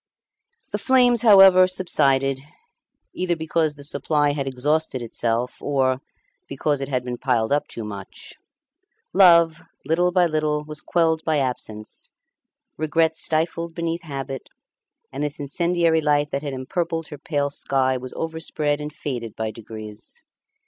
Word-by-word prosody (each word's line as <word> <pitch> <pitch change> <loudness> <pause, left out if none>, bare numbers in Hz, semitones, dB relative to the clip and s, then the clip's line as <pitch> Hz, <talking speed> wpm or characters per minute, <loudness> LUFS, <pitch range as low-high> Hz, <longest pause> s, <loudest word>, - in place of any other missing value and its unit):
The - - -2
flames, 245 -3 +4
however, 195 -4 +8
subsided, 135 -7 +1 0.7
either 180 -1 -1
because 160 -1 -1
the 145 - -12
supply 145 0 +1
had 140 -2 -3
exhausted 135 0 0
itself, 115 +1 -2
or 135 -2 0 0.5
because 140 +1 -1
it 135 - -4
had 125 -2 -1
been 125 -1 -5
piled 120 -4 0
up 145 +1 +1
too 115 - -7
much. 100 -2 -8 0.8
Love, 170 -4 +6 0.2
little 175 +3 +2
by 180 -1 +4
little, 155 -2 0
was 150 0 -4
quelled 160 -2 +1
by 155 -2 +1
absence; 115 -5 -3 0.7
regret 160 +1 +1
stifled 165 +1 -1
beneath 170 0 -2
habit; 135 -4 -6 0.6
and 140 +2 -3
this 150 0 -2
incendiary 165 +3 +1
light 145 -1 +1
that 140 - -2
had 145 -2 -4
empurpled 165 +4 -3
her 150 - -9
pale 145 -2 -1
sky 130 -2 +1
was 130 0 -6
overspread 160 -2 -2
and 150 0 -5
faded 120 -8 -5
by 110 -1 -3
degrees. 110 -1 -10
150 Hz, 140 wpm, -23 LUFS, 130-165 Hz, 0.8 s, however